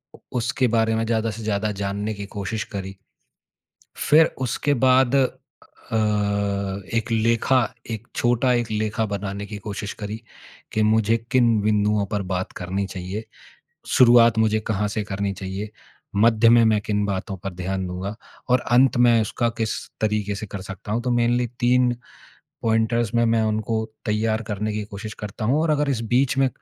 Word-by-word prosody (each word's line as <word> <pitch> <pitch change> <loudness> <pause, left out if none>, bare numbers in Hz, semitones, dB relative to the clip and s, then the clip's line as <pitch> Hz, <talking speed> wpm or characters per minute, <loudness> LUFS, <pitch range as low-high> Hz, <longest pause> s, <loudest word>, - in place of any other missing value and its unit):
उ - - -17 0.2
उसके 125 +2 +1
बारे 110 0 +2
में 115 0 0
ज़्यादा 115 0 0
से 110 +1 -8
ज़्यादा 105 0 -1
जानने 100 +2 -2
की 100 -1 -6
कोशिश 105 +2 -4
करी। 95 0 -5 1.0
फिर 155 +2 +5 0.2
उसके 145 +4 0
बाद 130 0 +4
अ, 130 -3 -4 1.0
एक 115 +1 -1
लेखा, 115 +3 +3 0.3
एक 115 +1 -5
छोटा 120 +1 +2
एक 120 -2 -1
लेखा 110 +1 -1
बनाने 100 0 -4
की 105 0 -7
कोशिश 105 0 -5
करी, 105 +2 -5 0.5
कि 110 - +1
मुझे 110 +1 +3 0.2
किन 120 -4 +4
बिंदुओं 105 -1 +2
पर 105 - 0
बात 90 +1 -3
करनी 95 +2 -2
चाहिए, 95 +3 -6 0.6
शुरुआत 120 -2 +6
मुझे 110 0 +3
कहाँ 105 -1 0
से 105 0 -2
करनी 100 -1 -3
चाहिए, 95 +2 -5 0.5
मध्य 115 +2 +5
में 120 0 +6
मैं 110 -1 +3
किन 105 0 -1
बातों 95 0 -3
पर 95 +1 -6
ध्यान 95 +1 -3
दूँगा 95 +4 -5 0.3
और 125 0 +4
अंत 125 +1 +5
मैं 120 -1 +5
उसका 115 +2 0
किस 110 -1 0 0.3
तरीके 105 -1 0
से 105 - -5
कर 100 -1 -6
सकता 95 +2 -8
हूँ। 115 - 0
तो 125 - 0
मेनली 120 +1 +2
3 125 0 +3 0.7
पॉइंटर्स 115 0 +1
में 115 0 +3
मैं 115 -1 +2
उनको 110 +1 -1 0.2
तैयार 110 +1 0
करने 105 +1 -2
की 105 0 -3
कोशिश 105 +1 -8
करता 105 +1 -6
हूँ 140 +6 +2
और 165 - +1
अगर 150 -1 +1
इस 125 -5 -1
बीच 135 +1 +2
में 135 -1 +4
110 Hz, 170 wpm, -23 LUFS, 100-120 Hz, 1.0 s, शुरुआत